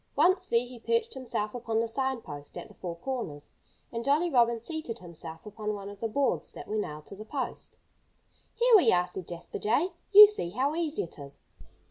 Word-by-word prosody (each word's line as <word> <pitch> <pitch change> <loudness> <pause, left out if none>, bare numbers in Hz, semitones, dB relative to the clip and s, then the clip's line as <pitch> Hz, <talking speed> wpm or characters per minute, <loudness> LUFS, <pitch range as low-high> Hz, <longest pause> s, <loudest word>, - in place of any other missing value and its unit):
Once 365 +5 +3
there, 235 +1 +2
he 245 -1 -11
perched 465 - 0
himself 215 -5 -3
upon 230 -2 -1
the 230 - +1
sign 265 +1 -1
post 145 -5 -9
at - - -7
the - - -16
four 175 -2 -6
corners. 170 - -5 0.4
And 230 0 -4
Jolly 305 +6 +2
Robin 235 -3 +4
seated 310 -1 -5
himself 165 -1 -10
upon 210 0 -4
one 200 0 -7
of 205 -1 -11
the 225 - -1
boards 275 +5 0
that - - -9
were 215 - -3
nailed 150 -7 -4
to - - -10
the 210 - -8
post. 260 +4 -5 0.8
"Here 475 0 +5
we 390 - +6
are!" 180 0 +3
said 180 0 -8
Jasper 170 -1 -7
Jay. 275 - +1 0.2
"You 420 +1 +13
see 410 - -2
how 260 - 0
easy 320 -2 -1
it 165 - -10
is." 140 0 -9
230 Hz, 205 wpm, -29 LUFS, 185-285 Hz, 0.8 s, You